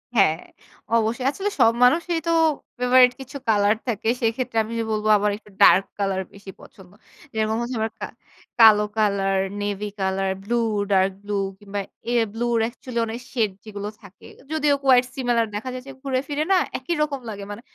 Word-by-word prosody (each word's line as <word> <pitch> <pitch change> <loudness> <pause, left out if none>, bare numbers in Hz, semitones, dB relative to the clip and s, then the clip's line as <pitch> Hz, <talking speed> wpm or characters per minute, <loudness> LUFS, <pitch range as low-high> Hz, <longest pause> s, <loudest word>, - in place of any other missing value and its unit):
হ্যাঁ, 175 -7 +4 0.6
অবশ্যই। 230 +3 0
আসলে 395 +7 -3
সব 225 - +6
মানুষই 335 +6 +3
তো - - +2 0.5
ফেভারাইট 250 0 +6
কিছু 265 +2 -8
কলার 205 0 +3
থাকে। 220 -2 -2
সেক্ষেত্রে 230 +1 -1
আমি 225 - -7 0.2
বলব 215 0 -2
আমার 205 0 +1
একটু 210 - -20
ডার্ক 195 +2 +7
কলার 195 -1 0
বেশি 200 -1 -11
পছন্দ। 190 -2 -16 0.4
যেরকম 220 0 0
হচ্ছে 240 +1 -4
আমার 220 +1 -1
কা - - -3 0.5
কালো 220 -2 +8 0.2
কালার, 195 -2 +1 0.2
নেভি 205 0 -3
কলার, 190 0 0
ব্লু, 235 +4 -1 0.4
ডার্ক 190 0 +3
ব্লু 205 0 -5 0.3
কিংবা 205 0 -5 0.3
এ - - 0 0.2
ব্লু 235 +1 -2 0.2
অ্যাকচুয়ালি 235 +1 -4
অনেক 225 +2 -5
শেড 220 -5 +1
যেগুলো 205 -2 -6
থাকে। 200 -2 -16 0.3
যদিও 300 -2 +2
quite 255 -2 +5
similar 240 -3 +1
দেখা 230 +5 -4
যাচ্ছে 260 +2 -8
ঘুরে 265 -2 -1
ফিরে 295 +1 -1
না, 380 - +6 0.2
একই 260 +7 -3
রকম 290 -3 -1
লাগে। 200 -2 -6
মানে 205 +3 -8
225 Hz, 170 wpm, -23 LUFS, 205-255 Hz, 0.6 s, কালো